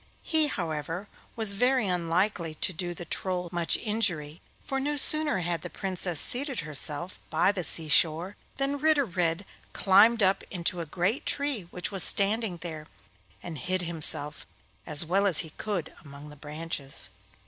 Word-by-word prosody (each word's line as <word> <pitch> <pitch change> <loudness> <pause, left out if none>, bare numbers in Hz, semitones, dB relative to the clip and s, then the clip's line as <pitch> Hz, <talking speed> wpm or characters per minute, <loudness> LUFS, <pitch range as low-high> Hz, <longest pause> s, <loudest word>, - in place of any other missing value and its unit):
He, 315 -1 +1
however, 165 - -4 0.3
was 220 -3 +5
very 250 +3 +1
unlikely 175 -1 -1
to 185 - +1
do 175 0 -4
the 175 - -8
Troll 180 +1 -3
much 170 -1 +1
injury, 175 -9 -2 0.2
for 270 - -4
no 290 +2 -2
sooner 300 -6 +3
had 170 -2 -2
the - - -7
Princess 185 -4 -3
seated 270 +1 0
herself 150 +3 -2
by 170 +4 +2
the 190 -3 -4
sea 160 +1 +4
shore 165 +5 +2 0.2
than 275 +1 -2
Ritter 305 -1 +2
Red 175 -1 -2 0.3
climbed 210 +4 +4
up 190 0 +2
into 175 -1 -2
a 165 - -7
great 180 - -2
tree 280 -10 -1
which 180 +3 -4
was 195 -4 +7
standing 205 -1 +4
there, 160 -3 -7 0.6
and 165 -4 -7
hid 185 +7 -2
himself 155 -3 +1 0.4
as 150 0 +2
well 195 +5 +1
as 180 -6 +3
he 160 - -12
could 190 -3 -5
among 145 0 -12
the 150 - -13
branches. 150 -1 -6
180 Hz, 160 wpm, -27 LUFS, 165-210 Hz, 0.6 s, was